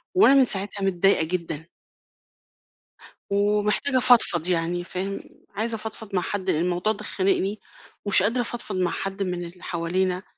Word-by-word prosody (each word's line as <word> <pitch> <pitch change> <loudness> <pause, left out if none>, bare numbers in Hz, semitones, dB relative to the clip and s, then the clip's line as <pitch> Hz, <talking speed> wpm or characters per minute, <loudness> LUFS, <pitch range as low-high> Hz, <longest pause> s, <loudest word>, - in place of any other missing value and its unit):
وأنا 370 -7 +6
من 270 -1 +6
ساعتها 200 -2 -1
متضايقة 195 -2 +3
جدًا. 165 -1 -4 1.6
ومحتاجة 210 +6 +1
أفضفض 225 -10 +5
يعني 175 0 -1
فاهم، 190 +2 -5 0.4
عايزة 225 +2 0
أفضفض 220 -1 -6
مع 180 - +1
حد 190 0 -3
لأن 155 - +1
الموضوع 180 +4 0
ده 210 0 -10
خانقني، 195 +1 -1 0.5
ومش 200 -2 +5
قادرة 230 +5 +1
أفضفض 235 -3 -5
مع 180 -2 0
حد 195 +1 -4
من 180 -2 -4
اللي 175 +1 -13
حوالينا 180 +2 -2
195 Hz, 145 wpm, -24 LUFS, 180-210 Hz, 1.6 s, وأنا